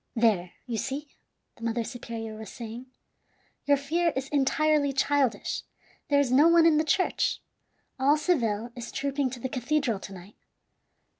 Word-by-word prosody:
"There, 210 -7 +2
you 235 -3 -3
see," 280 +5 -4 0.5
the 230 - -12
mother 230 0 0
superior 225 -2 -6
was 215 -2 -8
saying, 235 +1 -8 0.8
"your 285 -1 +4
fear 330 +5 0
is 265 +1 -3
entirely 290 +1 +2
childish; 270 -1 +1 0.5
there 285 -1 +4
is 275 -3 +1
no 285 +5 +6
one 335 -1 +6
in 320 -2 +5
the 310 - +3
church. 370 +4 +1 0.6
All 280 +3 +4
Seville 240 - 0
is 240 -1 -7
trooping 275 -1 -1
to 250 0 -8
the 260 - -3
cathedral 255 -3 -1
to 195 - -9
night. 190 +2 -12
265 Hz, 155 wpm, -27 LUFS, 230-295 Hz, 0.8 s, no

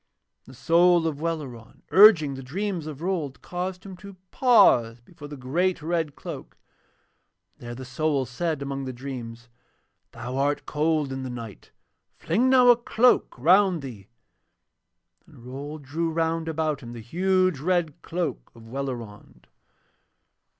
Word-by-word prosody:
And 130 - -13
the - - -18
soul 170 +3 +4
of 155 -3 -2
Welleran 145 -9 -5
urging 185 -8 +7
the 135 - -7
dreams 175 +4 -4
of 155 0 -8
Rold 165 -7 -3
caused 180 +1 -5
him 190 -1 -8
to 200 +1 -12 0.2
pause 120 - +4
before 145 +4 -13
the 145 0 -9
great 165 +7 -1
red 160 -3 -1
cloak, - - -9 1.0
and - - -15
there 120 - -6
the 130 +1 -8
soul 140 +1 -1
said 150 +4 -3
among 135 -1 -4
the 130 - -5
dreams: 120 -2 -8 0.6
'Thou 120 +3 -6
art 145 +1 0
cold 150 -2 0
in 135 - -5
the 130 - -5
night; 115 -5 -9 0.5
fling 255 +4 +1
now 255 -1 +6
a 240 - +7
cloak 240 - +2
around 180 +3 +4
thee.' 110 -7 -9 1.2
And 120 - -17
Rold 145 +4 -7
drew 160 +5 -2
round 165 0 -1
about 155 -3 -1
him 120 -2 -9
the 120 - -8
huge 185 - +1
red 170 -1 -1
cloak 175 -1 -4
of 115 - -14
Welleran. 120 -5 -7
150 Hz, 150 wpm, -25 LUFS, 130-175 Hz, 1.2 s, urging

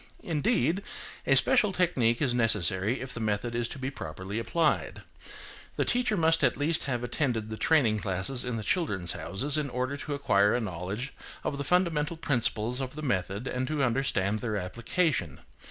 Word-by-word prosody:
Indeed, 175 - +1 0.5
a 135 - +5
special 220 - +5
technique 150 -10 +2
is 130 -4 +2
necessary 110 -1 +1
if 130 -1 -6
the 115 - -5
method 110 +2 -1
is 120 0 0
to - - -7
be 130 0 -3
properly 95 - -5
applied. 155 +6 0 0.7
The - - +1
teacher 245 -4 +1
must 165 -1 +3
at - - +3
least 155 +3 +1
have 120 -4 -2
attended 120 -4 -1
the - - -3
training 120 -9 +3
classes 100 +7 -2
in 125 -2 -3
the 110 - -4
"Children's 100 - 0
Houses," 100 - -1
in 145 -2 -2
order 130 +3 -2
to 145 0 -4
acquire 105 -7 +3
a - - +1
knowledge 100 +5 -4 0.3
of 140 - -2
the - - -1
fundamental 170 -1 +1
principles 125 -4 0
of 130 +1 -5
the 155 - -6
method 100 -2 -1
and 130 -1 -2
to 150 -1 0
understand 115 -5 +1
their 110 -3 -2
application. 110 - -1
125 Hz, 175 wpm, -29 LUFS, 105-150 Hz, 0.7 s, a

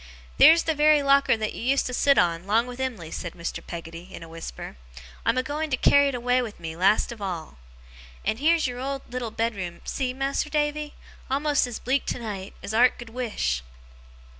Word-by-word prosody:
'Theer's 330 +1 +8
the 320 - +1
very 300 -1 +4
locker 275 -3 +4
that 215 -1 -3
you - - -7
used 270 +4 +2
to 250 - -4
sit 280 +2 +3
on, 170 +1 +2
'long 225 +3 +3
with 250 0 -9
Em'ly!' 225 -12 -4
said 170 - -5
Mr. 170 -1 -5
Peggotty, 170 +2 -8
in 170 - -9
a - - -10
whisper. 165 - -8 0.5
'I'm 255 - +3
a 255 - +2
going 300 +3 -3
to 260 - 0
carry 285 +2 +5
it 275 - -1
away 250 +1 +1
with 225 -4 -6
me, 160 -1 -6
last 195 +7 +3
of 230 -3 -9
all. 170 - -5 0.7
And 220 - 0
heer's 325 +2 +3
your 245 -1 -3
old 270 +1 -3
little 250 -2 -3
bedroom, 205 -6 -3
see, 260 -2 -2
Mas'r 275 +3 -2
Davy! 300 0 -1 0.3
A'most 285 +1 +1
as 240 - -5
bleak 265 +2 -1
tonight, 205 -5 -5
as 220 - -5
'art 245 +3 +4
could 240 -2 -10
wish! 220 - -2
245 Hz, 200 wpm, -25 LUFS, 190-275 Hz, 0.7 s, Theer's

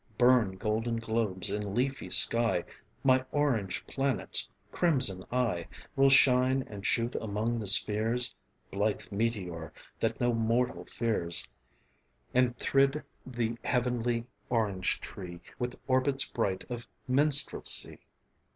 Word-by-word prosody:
Burn, 120 -5 +4
golden 110 +4 -2
globes 110 -4 -2
in 105 -1 -3
leafy 130 +2 -1
sky, 115 0 +3 0.4
My 130 -1 +4
orange 130 -10 -1
planets: 135 -1 0 0.2
crimson 130 - +2
I 115 -9 -1 0.3
Will 135 0 +5
shine 130 0 +4
and 100 -4 -10
shoot 115 +3 0
among 110 +2 -2
the 105 - -5
spheres 110 +5 +2 0.4
(Blithe 105 +2 -2
meteor 95 -7 -3 0.3
that - - -1
no 120 0 +1
mortal 115 +2 0
fears) 100 -8 -1 0.9
And 125 -1 +2
thrid 135 +2 +1 0.2
the 120 -2 -3
heavenly 120 -2 -1 0.2
orange 105 -6 +2
tree 85 -2 -8 0.2
With 125 0 -3
orbits 135 +1 +2
bright 100 -6 -2
of 120 -1 -6 0.2
minstrelsy. 140 +2 +3
115 Hz, 115 wpm, -30 LUFS, 105-130 Hz, 0.9 s, Will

